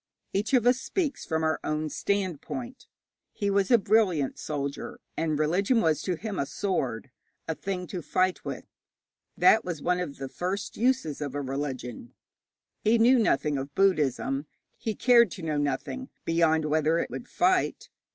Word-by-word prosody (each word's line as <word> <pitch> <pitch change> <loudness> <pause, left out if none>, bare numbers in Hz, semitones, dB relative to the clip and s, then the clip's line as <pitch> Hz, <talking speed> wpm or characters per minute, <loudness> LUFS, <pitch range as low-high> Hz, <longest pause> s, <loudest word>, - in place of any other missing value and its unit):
Each 215 +6 +1
of 240 -2 +3
us 250 +1 +4
speaks 315 -1 -2
from 160 -1 0
our 160 0 +1
own 155 0 -1
standpoint. 205 - -3 0.5
He 200 -2 -1
was 200 -1 +2
a 240 - +7
brilliant 195 -9 +2
soldier, 140 -2 -4 0.2
and 160 -1 0
a - - +1
religion 180 - +2
was 155 -7 +2
to 180 - -1
him 205 +2 -5
a 140 - -1
sword, 135 - -2 0.4
a 160 - 0
thing 185 +2 -4
to 180 -1 -5
fight 185 +3 0
with. - - -5 0.7
That 220 - +6
was 175 -4 -4
one 180 +4 0
of 160 -6 -4
the 135 - -5
first 185 +9 -4
uses 235 - 0
of 140 -2 -4
a 145 - -1
religion. 130 -4 -5 0.7
He 225 +2 +4
knew 240 +3 +5
nothing 150 -9 +1
of 140 +1 -7
Buddhism; 145 -6 +1 0.3
he 220 -2 -3
cared 235 -3 +5
to 185 - -9
know 155 -2 -1
nothing, 145 - -2 0.2
beyond 160 -1 +2
whether 155 +1 +2
it - - -2
would 245 - -6
fight. 370 +1 +1
175 Hz, 170 wpm, -27 LUFS, 150-215 Hz, 0.7 s, a